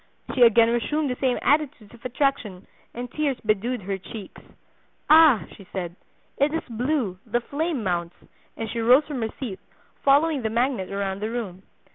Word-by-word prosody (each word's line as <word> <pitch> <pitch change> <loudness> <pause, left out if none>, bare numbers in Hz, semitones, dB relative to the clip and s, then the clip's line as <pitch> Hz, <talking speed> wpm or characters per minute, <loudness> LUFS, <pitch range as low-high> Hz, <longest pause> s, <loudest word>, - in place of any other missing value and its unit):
She 260 - -1
again 230 -1 +6
resumed 285 +4 0
the - - -2
same 255 -2 +2
attitudes 290 -7 0
of 235 - -16
attraction, 250 -7 -1 0.3
and 245 +1 -7
tears 290 -4 -1
bedewed 215 +2 0
her 195 +1 -3
cheeks. 205 +2 -10 0.7
'Ah,' 310 -8 +7
she 200 - -13
said, 175 -3 -4 0.4
'it 285 +2 +3
is 325 - -2
blue, 240 -5 -1
the 240 +1 -1
flame 285 +1 -3
mounts,' 175 -2 -2 0.4
and 225 - -3
she 230 +2 -4
rose 250 +6 +5
from 285 -5 -5
her 225 - -1
seat, 225 -8 -5 0.4
following 285 +1 +3
the 220 - -1
magnet 235 -4 -1
around 195 -1 -2
the 215 +2 -3
room. 215 -6 -5
240 Hz, 170 wpm, -24 LUFS, 205-275 Hz, 0.7 s, Ah